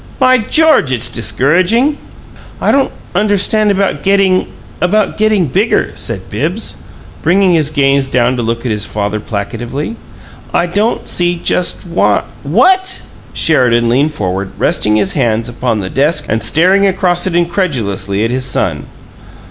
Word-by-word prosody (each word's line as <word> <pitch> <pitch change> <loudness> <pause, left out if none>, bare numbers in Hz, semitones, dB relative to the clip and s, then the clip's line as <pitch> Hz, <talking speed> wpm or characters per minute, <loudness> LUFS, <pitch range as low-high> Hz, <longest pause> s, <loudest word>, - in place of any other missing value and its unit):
By 255 -1 +4
George! 275 - +3
it's 120 -1 -1
discouraging!" 170 - +1 0.6
"I - - +1
don't 275 -1 +1 0.2
understand 205 +2 +2
about 195 -1 0
getting 195 -1 +2 0.3
about 205 +4 +1
getting 215 -4 +2
bigger," 195 - 0
said - - -4
Bibbs, - - -3 0.4
bringing 185 +2 +3
his 155 -3 +2
gaze 140 -2 +1
down 125 0 +1
to 120 - -2
look 115 +1 -3
at 120 - -1
his 105 -1 -1
father 105 0 -3
placatively. 120 - -5 0.6
"I 175 - +2
don't 205 +6 -1
see 175 0 +1
just 175 +2 -1
why 170 0 +1
" - - -23
"WHAT?" 375 0 +2 0.3
Sheridan 120 -6 +2
leaned 145 +5 +1
forward, 95 -2 -3
resting 105 0 +1
his 105 -3 +1
hands 115 -4 0
upon 120 -2 -2
the 95 - -5
desk 150 +3 +1
and 110 +1 -1
staring 185 - +3
across 180 -2 +1
it 175 - -2
incredulously 130 - -1
at 115 - -2
his 130 +1 -2
son. 90 - -2
150 Hz, 150 wpm, -13 LUFS, 115-195 Hz, 0.6 s, By